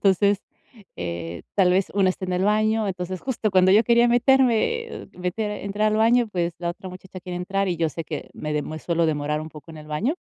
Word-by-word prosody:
entonces, 200 +1 +3 0.5
eh, 85 -1 -5
tal 185 -3 +4
vez 190 +1 +2
una 190 -2 +4
esté 185 - -5
en 180 - -2
el 185 +2 +1
baño. 215 +1 +2
Entonces, 185 0 -4
justo 235 -5 -1
cuando 185 -1 +5
yo 215 - +6
quería 235 0 +4
meterme, 265 - +3
eh, - - -9
uh, - - -18
meter 180 +4 -2
entrar 205 +2 +1
al - - +1
baño, 235 +1 +4
pues, 175 -3 -2
la 170 -1 -3
otra 190 +2 -9
muchacha 185 0 -10
quiere 180 0 -6
entrar 195 +2 -1
y 175 - -1
yo 165 -1 +1
sé 165 +1 -6
que 150 -1 -6
me 150 0 -4
dem 150 -1 -1
me 155 0 -5
suelo 170 0 0
demorar 150 0 -1
un 155 - -6
poco 155 +2 -12
en 160 - -10
el 150 - -11
baño. 200 - -1
185 Hz, 240 wpm, -24 LUFS, 165-215 Hz, 0.5 s, yo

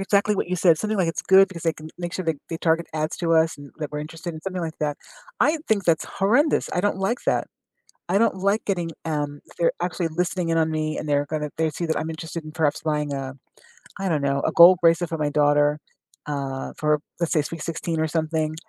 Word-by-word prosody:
exactly 200 +1 +2
what 190 - -2
you 180 - -1
said, 170 -2 +5
something 215 +2 -1
like 180 -3 +2
it's 165 - -3
good 190 +1 +6
because 175 -4 -9
they 165 - +2
can 155 0 -10
make 175 -1 -4
sure, 185 - -3
like, 160 -3 -1
they 165 - -3
target 165 0 +1
ads 155 0 -2
to 165 -2 0
us 160 0 +3
and 145 0 -11
that 150 -2 -4
we're 150 - -3
interested 165 +3 -7
in 155 - -8
something 185 +1 -4
like 160 -1 -5
that. 150 -1 -1 0.4
I 315 +2 +3
think 205 -3 +2
that's 165 -3 +2
horrendous. 245 +11 +2
I 180 - +1
don't 205 0 0
like 195 +6 0
that. - - +1 0.6
I 190 +3 +3
don't 230 -2 +2
like 200 +3 +1
getting, 175 -4 -1
um, 145 -2 -2 0.2
they're 170 - +3
actually 175 -1 -1
listening 175 +1 -1
in 165 - +2
on 160 0 +2
me 155 0 -2
and 155 - -5
they're 145 0 +2
gonna 150 -1 -3
they 160 -1 +1
see 170 +3 -4
that 160 - 0
I'm 160 - -3
interested 165 0 -6
in 155 - -9
perhaps 155 -2 0
buying 150 -2 -1
a 135 -1 -4 0.7
I 195 - -1
don't 155 -5 0
know, 140 0 0
a - - 0
gold 175 +2 +8
bracelet 165 0 +3
for 165 - -3
my 150 -1 0
daughter, 145 0 +3 0.5
uh, 140 -2 -4
for 150 -1 +2 0.2
let's 170 - 0
say 155 - +3
sweet 165 +1 -6
16 165 0 -3
or 160 - +1
something, 155 -1 -1
160 Hz, 240 wpm, -24 LUFS, 150-180 Hz, 0.7 s, gold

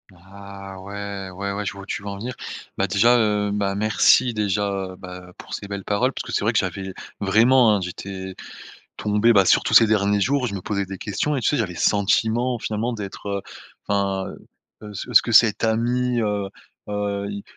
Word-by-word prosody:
Ah 100 +1 -11
ouais, 100 -1 -6
ouais, 100 +2 -4
ouais, 100 +1 -4
je 105 - -3
vois 100 - -10
où - - -11
tu - - -4
veux 100 - -9
en 100 - -5
venir, 120 +5 -5 0.5
bah, 100 - +2
déjà, 115 +6 +4
heu, 105 -2 +1
bah, 100 -1 -1
merci, 110 +4 +4
déjà, 100 -2 -1
bah, 90 0 -10
pour - - -11
ces 100 - -5
belles 100 -1 -5
paroles 120 +8 0
parce - - -5
que - - -8
c'est - - 0
vrai 110 - +2
que 115 - 0
j'avais 95 0 -4 0.3
vraiment, 115 +3 +4
hein, 100 - -1
j'étais 95 +1 -6 0.6
tombé, 105 +2 +3
bah, 100 -3 +5
surtout - - +3
ces 115 - +8
derniers 105 -1 +2
jours, 130 +4 +1
je 100 - -4
me 95 - -4
posais 100 -2 -2
des 95 0 -7
questions 130 +9 -2
et 135 - -1
tu - - +1
sais, 145 - +2
j'avais 110 -7 -1
le - - -9
sentiment 110 +4 +2
finalement 110 +3 -2
d'être, 105 -2 -7
heu, 100 -1 -2 0.5
enfin, 100 -1 0 0.6
heu, 105 -1 -9 0.2
est-ce 115 - +8
que 120 - -3
cet 115 -1 +5
ami, 120 +2 +1
heu 105 -2 -1 0.4
heu, 100 -1 -2
il 100 0 -6
100 Hz, 205 wpm, -22 LUFS, 100-110 Hz, 0.6 s, ces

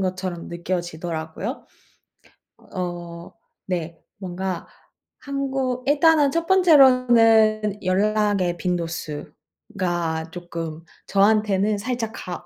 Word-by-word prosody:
것처럼 185 -2 -3
느껴지더라고요. 170 - -4 1.1
어 175 -2 -6 0.3
네, 170 -3 -4 0.2
뭔가 185 -1 -4 0.5
한국 270 -2 -2
일단은 295 -1 +4
첫 335 +2 -1
번째로는 240 - +5
연락의 200 -1 +1
빈도수가 170 0 -4
쪼끔 165 -2 -6 0.2
저한테는 205 0 +2
살짝 235 0 -3
가 175 -3 -7
190 Hz, 195 characters per minute, -23 LUFS, 175-230 Hz, 1.1 s, 번째로는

